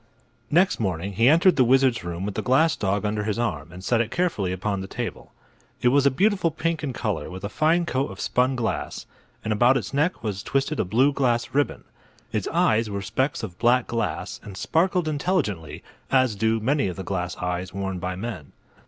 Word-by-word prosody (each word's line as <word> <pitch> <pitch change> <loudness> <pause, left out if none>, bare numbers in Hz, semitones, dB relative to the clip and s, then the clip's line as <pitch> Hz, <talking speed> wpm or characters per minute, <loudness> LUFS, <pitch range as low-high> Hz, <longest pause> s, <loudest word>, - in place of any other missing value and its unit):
Next 175 +5 +3
morning 95 -2 -2
he 115 +6 +4
entered 170 +4 +5
the 130 - +6
wizard's 130 -1 +3
room 85 +2 -4
with 105 - -3
the - - -2
glass 155 +6 +3
dog 100 +1 -1
under 105 0 -1
his 105 -1 -2
arm 85 -10 -2
and 90 +1 -10
set 115 +3 +2
it 115 - -2
carefully 160 - 0
upon 95 +1 -2
the 95 - -6
table. - - -6 0.5
It 125 - +6
was 140 +2 +4
a - - +7
beautiful 190 - +2
pink 160 0 -2
in 140 - -1
color, 105 -11 -3
with 95 +1 -8
a 100 - -3
fine 165 +8 +2
coat 135 -3 -1
of - - -10
spun 130 +2 +1
glass, 120 -3 -3 0.4
and 110 - 0
about 120 +5 +4
its 110 -2 -5
neck 150 0 0
was 100 -3 -3
twisted 135 +5 -1
a - - +1
blue 130 +9 +3
glass 120 -4 0
ribbon. 145 +1 0 0.5
Its - - -1
eyes 110 0 +2
were 100 -1 -4
specks 130 +6 -1
of 90 -5 -7
black 120 +1 +3
glass 115 -1 -3
and 100 -2 -9
sparkled 175 0 +1
intelligently, 140 - -1 0.3
as 130 -4 +3
do 110 +2 +1
many 135 +1 +1
of 90 - -4
the 95 - -6
glass 90 -2 -3
eyes 90 0 -3
worn 95 -1 -3
by 90 0 -3
men. 95 -8 -6
115 Hz, 205 wpm, -24 LUFS, 95-140 Hz, 0.5 s, a